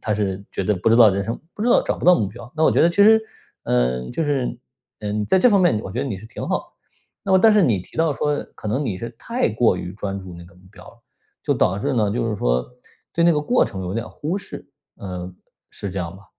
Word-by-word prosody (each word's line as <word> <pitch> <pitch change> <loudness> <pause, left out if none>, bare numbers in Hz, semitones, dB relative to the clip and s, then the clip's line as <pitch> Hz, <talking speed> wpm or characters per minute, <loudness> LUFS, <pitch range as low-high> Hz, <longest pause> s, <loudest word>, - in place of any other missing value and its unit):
他 105 - -1
是 100 -2 -2
觉 - - -2
得 105 +3 +1
不 95 +4 0
知 115 - +5
道 115 -2 +8
人 100 0 -1
生 115 - -4
不 210 - -5
知 240 - +1
道 - - +5
找 - - -2
不 - - -6
到 180 0 +7
目 105 - 0
标， 120 +3 -12
那 160 - -1
我 - - +5
觉 - - +3
得 170 - +5
其 170 - -9
实， 220 +2 +7 0.4
嗯， 60 0 0
就 165 - -1
是， 140 -5 -1 0.5
嗯， 105 0 -2
在 190 - +3
这 250 - +5
方 205 -4 +4
面 175 - +4
你 - - -4
我 95 - -7
觉 115 - -5
得 135 - 0
你 105 -7 -4
是 110 - -12
挺 115 - -7
好 - - 0
的。 - - -12 0.6
那 195 - 0
么 190 - +6
但 220 +4 +6
是 210 - +5
你 115 - +2
提 - - -15
到 160 -1 +2
说 145 +1 -1 0.2
可 105 - -7
能 130 +8 -1
你 100 -7 -3
是 115 - -5
太 235 - -1
过 110 -3 +2
于 90 0 -6
专 100 -1 -4
注 95 -2 -10
那 85 - -11
个 85 +1 -18
目 90 - -21
标 110 - -14
了， 115 - -17 0.4
就 - - +1
导 95 +2 +1
致 115 - -1
呢， 105 -4 +1
就 115 +2 -1
是 105 - -2
说， - - +1 0.5
对 170 - +2
那 170 - +5
个 150 - +1
过 245 +12 +2
程 95 - -6
有 90 +1 -4
点 115 +1 -3
忽 160 +6 -4
视， - - -10 0.3
呃， 90 -1 -7 0.4
是 100 - -6
这 95 - -5
样 85 0 -4
吧？ 100 - -17
110 Hz, 305 characters per minute, -21 LUFS, 95-150 Hz, 0.6 s, 道